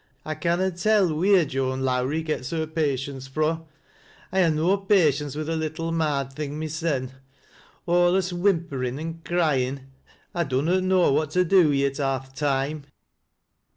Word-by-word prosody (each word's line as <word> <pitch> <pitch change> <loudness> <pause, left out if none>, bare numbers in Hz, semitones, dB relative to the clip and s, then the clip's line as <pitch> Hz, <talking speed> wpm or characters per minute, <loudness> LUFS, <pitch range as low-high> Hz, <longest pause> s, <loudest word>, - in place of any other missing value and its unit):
I 155 - -2
canna 175 +4 0
tell 185 -1 +2
wheer 180 +2 +4
Joan 130 -1 -2
Lowrie 130 +4 0
gets 150 -5 -3
her 160 -1 -1
patience 140 -4 -2
fro'. 155 +4 -1 0.6
I 190 +1 +2
ha' 170 -3 +4
no 160 +5 +2
patience 155 -8 +2
with 155 0 -3
the 165 +1 -2
little 160 +1 -3
marred 145 -5 -1
thing 150 0 -5
mysen 155 -4 -2 0.4
— - - -29
alius 175 +1 +3
whimperin' 165 -9 0
an' 165 +1 -6
cryin'; 135 -6 0 0.4
I 175 - 0
dunnot 150 +8 +1
know 185 -4 +3
what 155 +1 +1
to 180 - +4
do 180 -3 +5
wi' 140 -1 +2
it 135 -1 -2
half 135 -1 -2
th' - - -28
toime." 140 +1 -1
155 Hz, 155 wpm, -25 LUFS, 140-175 Hz, 0.6 s, do